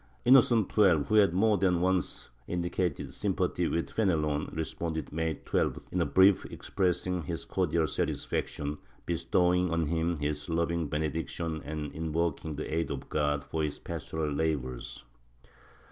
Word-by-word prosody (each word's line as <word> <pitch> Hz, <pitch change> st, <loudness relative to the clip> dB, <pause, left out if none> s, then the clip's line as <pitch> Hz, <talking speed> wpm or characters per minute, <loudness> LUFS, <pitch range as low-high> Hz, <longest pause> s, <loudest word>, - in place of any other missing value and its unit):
Innocent 120 Hz, -4 st, +5 dB
XII, 90 Hz, -8 st, +5 dB
who -, -, 0 dB
had 105 Hz, -4 st, +6 dB
more 105 Hz, +3 st, +3 dB
than 90 Hz, -2 st, +3 dB
once 90 Hz, 0 st, -1 dB, 0.2 s
indicated 85 Hz, -2 st, -2 dB
sym -, -, -1 dB
pathy -, -, 0 dB
with 85 Hz, -, -2 dB
Fenelon, 75 Hz, -8 st, +1 dB
responded 80 Hz, -1 st, -4 dB
May 80 Hz, 0 st, -1 dB
12th, -, -, -1 dB
in -, -, 0 dB
a -, -, +1 dB
brief 95 Hz, +1 st, +5 dB
expressing 90 Hz, -1 st, -1 dB
his 85 Hz, +2 st, -5 dB
cordial -, -, +1 dB
satisfaction, 75 Hz, 0 st, -2 dB, 0.3 s
bestowing 90 Hz, +2 st, +2 dB
on 85 Hz, -1 st, +1 dB
him 85 Hz, +2 st, 0 dB
his 75 Hz, +2 st, -3 dB
loving 85 Hz, -1 st, 0 dB
benediction 80 Hz, +2 st, -2 dB
and 75 Hz, -1 st, -4 dB
invoking 80 Hz, -1 st, -2 dB
the 75 Hz, -, -5 dB
aid 80 Hz, +1 st, 0 dB
of -, -, -5 dB
God 75 Hz, -1 st, 0 dB
for 75 Hz, +4 st, -3 dB
his 75 Hz, -1 st, -2 dB
pastoral 80 Hz, -2 st, -4 dB
labors. 70 Hz, -5 st, -2 dB
80 Hz, 145 wpm, -30 LUFS, 75-90 Hz, 0.3 s, had